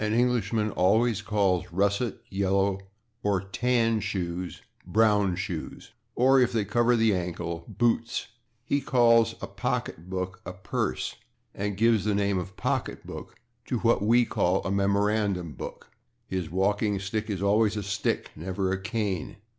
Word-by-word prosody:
An 110 Hz, 0 st, 0 dB
Englishman 115 Hz, -3 st, +1 dB
always 105 Hz, +4 st, +2 dB
calls 100 Hz, -4 st, 0 dB
russet, 100 Hz, +5 st, 0 dB
yellow 95 Hz, 0 st, +1 dB, 0.4 s
or 100 Hz, -3 st, +1 dB
tan 115 Hz, +3 st, +1 dB
shoes 90 Hz, -4 st, -4 dB, 0.3 s
/brown/ 105 Hz, -4 st, +3 dB
shoes 90 Hz, -4 st, -5 dB, 0.2 s
(or, 130 Hz, +2 st, +5 dB
if 125 Hz, -, +3 dB
they 110 Hz, -3 st, 0 dB
cover 120 Hz, +3 st, +3 dB
the 110 Hz, -2 st, +3 dB
ankle, 85 Hz, -2 st, -4 dB
/boots/). 115 Hz, -1 st, 0 dB, 0.4 s
He 140 Hz, +2 st, 0 dB
calls 115 Hz, -3 st, +4 dB
a -, -, -3 dB
pocketbook 90 Hz, +2 st, -3 dB
a 90 Hz, -, -6 dB
/purse/, 90 Hz, -8 st, -3 dB, 0.4 s
and 100 Hz, -1 st, -3 dB
gives 110 Hz, -2 st, +3 dB
the 105 Hz, -1 st, +1 dB
name 100 Hz, -1 st, +1 dB
of 95 Hz, +2 st, -7 dB
/pocketbook/ -, -, -4 dB, 0.3 s
to 125 Hz, -, 0 dB
what 115 Hz, -3 st, +3 dB
we 120 Hz, +3 st, +4 dB
call 90 Hz, -2 st, +1 dB
a 95 Hz, -, -1 dB
/memorandum 100 Hz, -4 st, +1 dB
book/. -, -, -8 dB, 0.3 s
His 90 Hz, -4 st, -3 dB
walking 100 Hz, +3 st, +1 dB
stick 105 Hz, +3 st, -3 dB
is 100 Hz, -2 st, -2 dB
always 105 Hz, +1 st, +3 dB
a -, -, -1 dB
/stick/, 100 Hz, 0 st, -1 dB
never 95 Hz, +3 st, -2 dB
a 95 Hz, 0 st, -2 dB
/cane 95 Hz, -2 st, -2 dB
100 Hz, 145 wpm, -27 LUFS, 95-115 Hz, 0.4 s, or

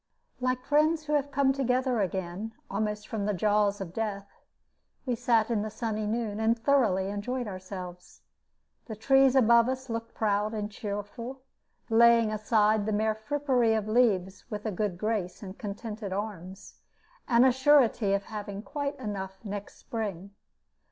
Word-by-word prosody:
Like 255 Hz, 0 st, -1 dB
friends 310 Hz, +2 st, +3 dB
who 300 Hz, -, -2 dB
have 285 Hz, -1 st, +1 dB
come 275 Hz, -1 st, +2 dB
together 255 Hz, -3 st, +1 dB
again, 190 Hz, +3 st, -3 dB, 0.2 s
almost 210 Hz, +1 st, -2 dB
from 215 Hz, -4 st, -3 dB
the 210 Hz, -, 0 dB
jaws 205 Hz, +1 st, +2 dB
of 180 Hz, -3 st, -6 dB
death, 205 Hz, -2 st, -3 dB, 0.8 s
we 250 Hz, -, 0 dB
sat 235 Hz, -1 st, +2 dB
in 220 Hz, -3 st, +1 dB
the 215 Hz, -, -3 dB
sunny 215 Hz, -1 st, -3 dB
noon, 220 Hz, -1 st, -2 dB
and 225 Hz, +1 st, +2 dB
thoroughly 225 Hz, -7 st, +2 dB
enjoyed 240 Hz, +5 st, -3 dB
ourselves. 185 Hz, -2 st, -8 dB, 0.7 s
The 220 Hz, -, -5 dB
trees 270 Hz, +4 st, +4 dB
above 235 Hz, -1 st, +5 dB
us 260 Hz, -1 st, -4 dB
looked 230 Hz, 0 st, -5 dB
proud 210 Hz, 0 st, 0 dB
and 210 Hz, 0 st, -3 dB
cheerful, 215 Hz, +6 st, -6 dB, 0.4 s
laying 230 Hz, -1 st, +5 dB
aside 215 Hz, -1 st, +2 dB
the -, -, 0 dB
mere 215 Hz, +1 st, +1 dB
frippery 245 Hz, 0 st, +1 dB
of 215 Hz, -1 st, -1 dB
leaves 200 Hz, -5 st, +2 dB
with 210 Hz, -1 st, -5 dB
a 215 Hz, -, -1 dB
good 200 Hz, -1 st, -2 dB
grace 210 Hz, -2 st, -2 dB
and 190 Hz, -1 st, -8 dB
contented 210 Hz, 0 st, -6 dB
arms, 195 Hz, -2 st, -6 dB, 0.5 s
and 240 Hz, -1 st, +5 dB
a 260 Hz, -, +6 dB
surety 255 Hz, -6 st, +4 dB
of 200 Hz, 0 st, 0 dB
having 205 Hz, -1 st, -6 dB
quite 285 Hz, +1 st, -4 dB
enough 195 Hz, -5 st, -5 dB
next 205 Hz, 0 st, -6 dB
spring. 200 Hz, -4 st, -5 dB
215 Hz, 155 wpm, -28 LUFS, 205-245 Hz, 0.8 s, a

